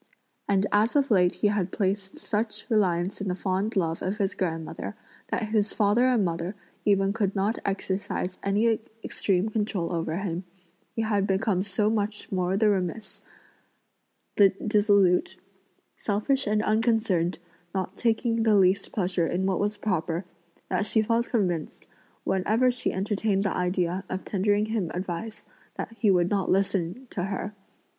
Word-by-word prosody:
And 200 Hz, 0 st, +3 dB
as 215 Hz, +5 st, +3 dB
of 280 Hz, -3 st, +2 dB
late 180 Hz, -3 st, +5 dB
he 210 Hz, -, +1 dB
had 195 Hz, -3 st, -1 dB
placed 195 Hz, -1 st, -2 dB
such 215 Hz, +1 st, -2 dB
reliance 190 Hz, -3 st, +1 dB
in 200 Hz, -, -3 dB
the 180 Hz, -, 0 dB
fond 190 Hz, +3 st, -1 dB
love 165 Hz, -4 st, 0 dB
of 190 Hz, +3 st, -2 dB
his 200 Hz, -2 st, 0 dB
grandmother 165 Hz, -3 st, -3 dB, 0.3 s
that 215 Hz, -, -2 dB
his 215 Hz, -1 st, +1 dB
father 210 Hz, +3 st, +3 dB
and 240 Hz, -6 st, +3 dB
mother 170 Hz, +3 st, -3 dB, 0.3 s
even 195 Hz, -1 st, +3 dB
could 205 Hz, -3 st, -1 dB
not 205 Hz, +4 st, 0 dB
exercise 195 Hz, -1 st, -2 dB
any 215 Hz, +3 st, +2 dB, 0.2 s
extreme 195 Hz, +1 st, 0 dB
control 205 Hz, -5 st, -1 dB
over 165 Hz, -1 st, -1 dB
him, 185 Hz, -2 st, -3 dB, 0.5 s
he 225 Hz, -, 0 dB
had 205 Hz, -2 st, +1 dB
become 190 Hz, -1 st, +1 dB
so 205 Hz, +2 st, 0 dB
much 210 Hz, -1 st, -2 dB
the -, -, -3 dB
more 185 Hz, +1 st, +1 dB
remiss, 205 Hz, 0 st, 0 dB, 1.4 s
dissolute, 205 Hz, -4 st, +3 dB, 0.6 s
selfish 230 Hz, +6 st, 0 dB
and 210 Hz, +1 st, +2 dB
unconcerned, 215 Hz, -6 st, +1 dB, 0.4 s
not 190 Hz, -2 st, -2 dB
taking 230 Hz, 0 st, +1 dB
the 220 Hz, -2 st, +4 dB
least 195 Hz, 0 st, +3 dB
pleasure 180 Hz, -4 st, 0 dB
in 185 Hz, +2 st, -1 dB
what 190 Hz, -2 st, +1 dB
was 205 Hz, +1 st, -1 dB
proper, 175 Hz, -3 st, -1 dB, 0.4 s
that 210 Hz, -, 0 dB
she 220 Hz, 0 st, +3 dB
felt 230 Hz, +2 st, +1 dB
convinced, 180 Hz, -9 st, -1 dB, 0.4 s
whenever 220 Hz, +7 st, +2 dB
she 250 Hz, -, -2 dB
entertained 200 Hz, 0 st, 0 dB
the 195 Hz, -, -1 dB
idea 180 Hz, 0 st, 0 dB
of 185 Hz, -, -4 dB
tendering 205 Hz, +1 st, +1 dB
him 220 Hz, -6 st, -1 dB
advice, 185 Hz, +4 st, -5 dB, 0.3 s
that -, -, -5 dB
he 215 Hz, -, +3 dB
would 180 Hz, -2 st, +3 dB
not 195 Hz, -3 st, 0 dB
listen 195 Hz, +4 st, 0 dB
to 175 Hz, -, -2 dB
her. 195 Hz, +1 st, -4 dB
200 Hz, 150 wpm, -27 LUFS, 185-215 Hz, 1.4 s, late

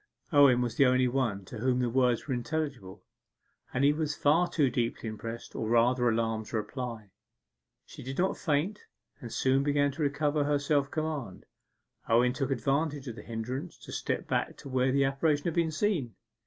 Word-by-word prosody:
Owen 140 Hz, -4 st, +6 dB
was 120 Hz, -2 st, -2 dB
the 140 Hz, -, +6 dB
only 130 Hz, 0 st, +3 dB
one 120 Hz, -7 st, -1 dB
to 110 Hz, -, -8 dB
whom 125 Hz, +2 st, +1 dB
the 125 Hz, -1 st, +1 dB
words 125 Hz, 0 st, +1 dB
were 135 Hz, -, -1 dB
intelligible, 120 Hz, -7 st, -4 dB, 0.7 s
and 125 Hz, -, 0 dB
he 145 Hz, +1 st, +5 dB
was 150 Hz, -1 st, -2 dB
far 165 Hz, +5 st, +3 dB
too 145 Hz, -5 st, +2 dB
deeply 120 Hz, -2 st, -2 dB
impressed, 115 Hz, +2 st, -7 dB
or 110 Hz, -, -2 dB
rather 120 Hz, +1 st, +3 dB
alarmed, 110 Hz, -1 st, -1 dB
to 115 Hz, -, -2 dB
reply. 110 Hz, -2 st, -5 dB, 0.7 s
She -, -, -12 dB
did 130 Hz, +2 st, -6 dB
not 185 Hz, +2 st, +1 dB
faint, 165 Hz, +7 st, -1 dB, 0.4 s
and 120 Hz, -, -8 dB
soon 135 Hz, +1 st, +2 dB
began 145 Hz, 0 st, +2 dB
to 150 Hz, +4 st, -7 dB
recover 145 Hz, +1 st, +1 dB
her 145 Hz, 0 st, +2 dB
self 140 Hz, -1 st, +1 dB
command. 150 Hz, -, -4 dB, 0.6 s
Owen 120 Hz, +2 st, +4 dB
took 135 Hz, +1 st, -2 dB
advantage 140 Hz, +3 st, -1 dB
of 120 Hz, -, -5 dB
the 105 Hz, -, -9 dB
hindrance 125 Hz, +9 st, -5 dB
to -, -, -12 dB
step -, -, -3 dB
back -, -, -1 dB
to 140 Hz, -, -10 dB
where 130 Hz, 0 st, +2 dB
the 140 Hz, +1 st, +3 dB
apparition 145 Hz, +2 st, +1 dB
had 170 Hz, -, 0 dB
been 170 Hz, -1 st, +1 dB
seen. 155 Hz, -, -1 dB
130 Hz, 185 wpm, -29 LUFS, 120-145 Hz, 0.7 s, Owen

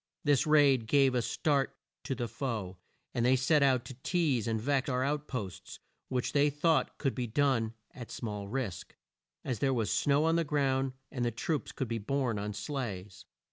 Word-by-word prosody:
This 145 Hz, -2 st, +3 dB
raid 140 Hz, -6 st, +5 dB
gave 135 Hz, 0 st, +4 dB
a 125 Hz, -, +2 dB
start 140 Hz, +3 st, 0 dB, 0.3 s
to 135 Hz, -, -1 dB
the 120 Hz, 0 st, -2 dB
foe 110 Hz, -8 st, -4 dB, 0.3 s
and 120 Hz, -, 0 dB
they 125 Hz, +2 st, +5 dB
set 140 Hz, +4 st, +3 dB
out 130 Hz, -3 st, +3 dB
to -, -, -7 dB
tease 135 Hz, -, 0 dB
and 110 Hz, -1 st, 0 dB
vex 135 Hz, +3 st, 0 dB
our 130 Hz, -1 st, +1 dB
out 150 Hz, +2 st, -1 dB
posts, 100 Hz, -9 st, -6 dB, 0.3 s
which 125 Hz, -2 st, -2 dB
they 145 Hz, 0 st, +4 dB
thought 155 Hz, +3 st, +1 dB
could 135 Hz, -3 st, 0 dB
be 125 Hz, -2 st, -3 dB
done 115 Hz, -3 st, +1 dB, 0.2 s
at 125 Hz, -3 st, -9 dB
small 105 Hz, -4 st, -5 dB
risk, 115 Hz, -4 st, -4 dB, 0.5 s
as 125 Hz, -5 st, -2 dB
there 135 Hz, +1 st, +2 dB
was 115 Hz, -3 st, 0 dB
snow 145 Hz, +2 st, +3 dB
on 165 Hz, +1 st, +3 dB
the 170 Hz, -, +2 dB
ground, 135 Hz, -3 st, 0 dB, 0.2 s
and 125 Hz, -, -2 dB
the 120 Hz, -, +2 dB
troops 135 Hz, +6 st, -2 dB
could 130 Hz, -, -3 dB
be 115 Hz, 0 st, -2 dB
borne 125 Hz, -1 st, -1 dB
on 105 Hz, +1 st, -3 dB
sleighs. 105 Hz, -10 st, -5 dB
130 Hz, 190 wpm, -31 LUFS, 115-140 Hz, 0.5 s, raid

